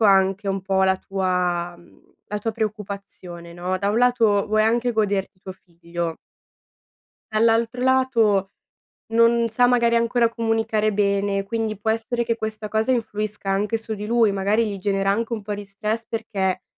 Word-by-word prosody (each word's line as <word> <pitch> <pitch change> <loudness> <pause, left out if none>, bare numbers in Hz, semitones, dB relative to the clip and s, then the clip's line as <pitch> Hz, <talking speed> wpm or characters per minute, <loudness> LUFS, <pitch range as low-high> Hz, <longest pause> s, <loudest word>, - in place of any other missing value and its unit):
capisco 220 - +3
anche 195 0 +3
un 195 0 -1
po' 190 0 +1
la 190 0 +3
tua 180 -3 -1
mhmm, 175 - -22 0.2
la 210 - -3
tua 225 +1 -2
preoccupazione, 200 -5 -6
no, 180 +2 -3
da 200 - 0
un 220 - +1
lato 230 -5 +3
vuoi 215 0 +2
anche 240 +2 +1
goderti 200 -3 -1
tuo 190 - -8
figlio 170 -2 -6 1.2
dall'altro 230 +2 +2
lato 230 -7 +2 0.6
non 230 0 +4
sa 245 +3 +3
magari 235 -1 +3
ancora 235 0 +2
comunicare 225 -2 0
bene, 200 -1 +1
quindi 220 0 -3
può 220 +2 0
essere 230 +2 -1
che 230 -1 0
questa 215 -1 -5
cosa 220 +3 0
influisca 210 -4 -2
anche 210 +3 0
su 220 0 -4
di 210 0 -6
lui. 230 -3 +3
Magari 200 +4 +1
gli 200 -2 -5
genera 195 0 +1
anche 230 +3 -1
un 215 -3 -3
po' 210 - -4
di 205 0 -5
stress, 215 +3 -4
perché 200 -5 -2
210 Hz, 170 wpm, -23 LUFS, 195-230 Hz, 1.2 s, non